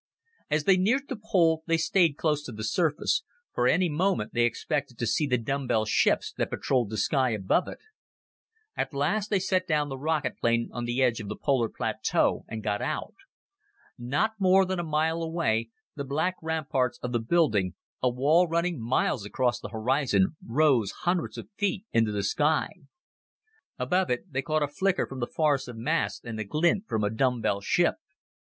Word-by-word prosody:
As 150 0 +1
they 190 +3 +5
neared 250 +9 +1
the 265 - -2
pole, 165 -6 +3
they 165 0 +3
stayed 165 -2 +2
close 150 -2 +1
to - - -6
the 110 -1 -7
surface, 160 - +1 0.3
for, - - +2
any 185 -1 +3
moment, 170 - 0
they 120 0 +3
expected 140 +1 -2
to 120 - -2
see 120 +7 +1
the 125 -2 +2
dumbbell 120 -2 -1
ships 110 - +2
that - - 0
patrolled 125 -6 0
the 110 - -4
sky 130 +5 +2
above 110 - +1
it. - - -7 1.0
At 145 - -3
last 200 +9 0
they 205 - +2
set 185 0 0
down 150 -3 +1
the 135 -1 -6
rocket 150 -3 -1
plane 115 0 +1
on 120 -1 -3
the 120 +2 0
edge 120 -3 +2
of 105 - -6
the 105 - -4
polar 130 -6 +1
plateau - - 0
and 110 -1 -6
got 105 0 -1
out. 155 - -3 0.8
Not 140 - 0
more 190 0 +5
than 185 -1 -2
a - - -1
mile 160 +1 0
away, 160 -10 0 0.3
the 140 - -4
black 155 +7 0
ramparts 155 -6 -1
of 125 - -3
the 120 - +1
building 115 - +1 0.3
a 125 - +3
wall 150 +8 +3
running 170 -3 -1
miles 115 -1 0
across 120 +3 0
the - - -7
horizon 120 0 +1
rose 125 -4 +2
hundreds 175 -1 0
of - - -7
feet 200 0 -1
into 115 -2 +3
the 100 -1 -2
sky. 150 +10 +1 1.1
Above 185 +1 0
it, 125 +6 -3
they 135 - 0
caught 155 +1 0
a - - 0
flicker 190 +6 0
from 135 - -8
the 120 - -2
forest 150 -4 +1
of 120 -2 -8
masts 155 +9 -1
and 115 -2 -5
the - - -1
glint 170 - +1
from 110 -1 -1
a 105 - +1
dumbbell 115 -4 0
ship. 175 - +2
140 Hz, 185 wpm, -27 LUFS, 120-165 Hz, 1.1 s, they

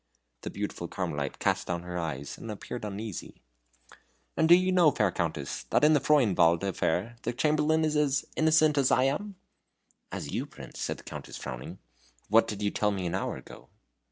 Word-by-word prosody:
The - - -5
beautiful 100 -4 -4
Carmelite 75 -7 -3
cast - - 0
down 85 0 -2
her 90 0 -6
eyes, 70 -4 -4
and 115 - -9
appeared 110 +3 -6
uneasy. 105 -2 -6 1.0
"And 160 0 +2
do 175 - +10
you 185 +1 +2
know, 180 -4 +6
fair 105 -8 +1
Countess, 80 -6 -3
that - - +2
in 155 +1 +6
the 150 - +5
Freudenwald 100 - +3
affair 100 +3 -1
the 120 - -2
Chamberlain 155 +3 +2
is 155 0 0
as 145 -2 +2
innocent 155 -2 +4
as 135 - +3
I 130 - +4
am?" 190 +10 -1 0.8
"As - - -5
you, - - -2
Prince?" - - -11
said - - -2
the - - -14
Countess, - - -8
frowning, 65 0 -7 0.5
"what 115 +2 +5
did 105 -1 -4
you 100 - +1
tell 105 - +1
me 95 -3 -2
an 85 - -2
hour 95 - -2
ago?" - - -13
110 Hz, 185 wpm, -29 LUFS, -, 1.0 s, do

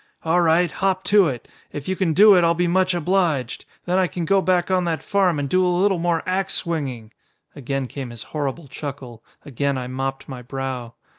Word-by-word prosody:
'All 165 +2 +2
right, 170 0 +3
hop 190 +1 -1
to 195 0 +4
it. 125 -6 -5 0.2
If 145 -1 -7
you 190 - -1
can 180 -4 0
do 210 +2 +8
it 180 -2 +4
I'll 170 0 +3
be 175 +1 +1
much 185 +1 +2
obliged. 170 -7 0 0.2
Then 180 +1 +1
I 185 - +2
can 175 -1 -4
go 195 +4 +3
back 185 -1 +1
on 185 -1 +2
that 165 -2 -2
farm 190 -5 +1
and 145 -1 -2
do 185 +6 +2
a - - +2
little 180 +1 +2
more 170 -1 0
ax 190 +1 0
swinging!'" 135 -10 -4 0.4
Again 135 -1 -3
came 130 0 -7
his 120 -2 -9
horrible 145 +1 -4
chuckle, 135 -4 -8 0.2
again 140 0 -1
I 125 - -4
mopped 135 +1 -4
my 130 -3 -7
brow. 125 -2 -5
165 Hz, 210 wpm, -22 LUFS, 135-185 Hz, 0.4 s, do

